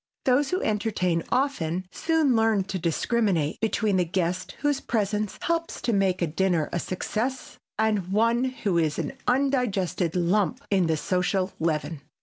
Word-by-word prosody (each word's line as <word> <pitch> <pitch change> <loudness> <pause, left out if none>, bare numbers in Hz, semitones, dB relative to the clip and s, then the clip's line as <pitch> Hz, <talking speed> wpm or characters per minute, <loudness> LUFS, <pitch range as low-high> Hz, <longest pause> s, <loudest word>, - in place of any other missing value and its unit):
Those 270 +2 +3
who 370 - -1
entertain 205 -6 0
often 185 - 0
soon 320 -6 +2
learn 225 -3 +3
to 190 0 -4
discriminate 175 -1 0
between 215 -3 +1
the 180 - +3
guest 180 +1 -2
whose 290 -2 +1
presence 210 -2 -1
helps 335 0 -1
to 235 - +1
make 190 -3 +1
a - - +4
dinner 170 0 0
a 175 - 0
success 225 +9 -3 0.2
and 215 -4 +1
one 230 +4 +3
who 215 -9 0
is 155 -2 0
an - - -3
undigested 245 - +1
lump 195 +7 +1
in 190 -4 +3
the 160 -1 +1
social 185 +3 0
leaven. 160 -2 -1
200 Hz, 150 wpm, -26 LUFS, 175-235 Hz, 0.2 s, a